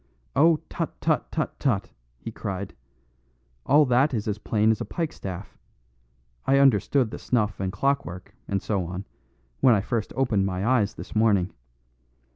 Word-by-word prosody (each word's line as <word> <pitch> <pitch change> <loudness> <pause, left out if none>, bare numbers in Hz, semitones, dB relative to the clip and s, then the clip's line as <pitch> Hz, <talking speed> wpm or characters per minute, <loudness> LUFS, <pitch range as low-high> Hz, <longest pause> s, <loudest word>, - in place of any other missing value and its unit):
"Oh, 160 +2 +5
tut, 165 - -4
tut, 160 -2 0
tut, 155 - -3
tut!" 120 -9 0 0.3
he - - -7
cried. 95 0 -5 0.9
"All 150 +2 +6
that 130 +2 +3
is 105 -1 -2
as 105 0 -2
plain 110 0 +2
as 110 - -1
a - - 0
pikestaff. 100 - -5 0.9
I 135 - +3
understood 130 -1 +3
the - - -6
snuff 110 -5 0
and 95 -1 -1
clockwork, 100 -5 -2
and 100 -1 -1
so 100 -4 0
on, 90 +3 -6 0.5
when 125 -3 +6
I 100 - +1
first 115 +1 -2
opened 110 -7 +1
my 95 +1 -2
eyes 115 -4 +2
this - - -9
morning. 105 -4 +3
110 Hz, 155 wpm, -25 LUFS, 100-135 Hz, 0.9 s, All